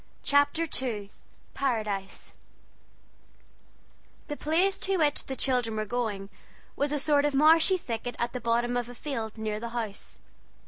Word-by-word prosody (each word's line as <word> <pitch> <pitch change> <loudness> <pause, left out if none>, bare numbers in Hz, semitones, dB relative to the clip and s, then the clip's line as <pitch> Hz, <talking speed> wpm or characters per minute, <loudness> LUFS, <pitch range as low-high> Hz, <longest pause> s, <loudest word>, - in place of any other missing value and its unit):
CHAPTER 285 +3 +3
II 210 -6 -4 0.4
PARADISE 215 -7 -2 2.0
The 295 - -2
place 345 +7 +1
to 385 0 +1
which 300 -3 +1
the 265 - -3
children 250 -5 +1
were 215 0 -1
going 210 -4 -3 0.4
was 285 0 0
a 295 - +1
sort 285 0 +3
of 295 -1 +1
marshy 320 +6 +6
thicket 245 -5 -4
at 235 0 -2
the 250 - -4
bottom 235 +1 +1
of 245 -1 -1
a 245 - -9
field 230 -5 -4
near 215 -1 -2
the 235 +1 -5
house. 215 -4 -5
245 Hz, 145 wpm, -28 LUFS, 220-290 Hz, 2.0 s, marshy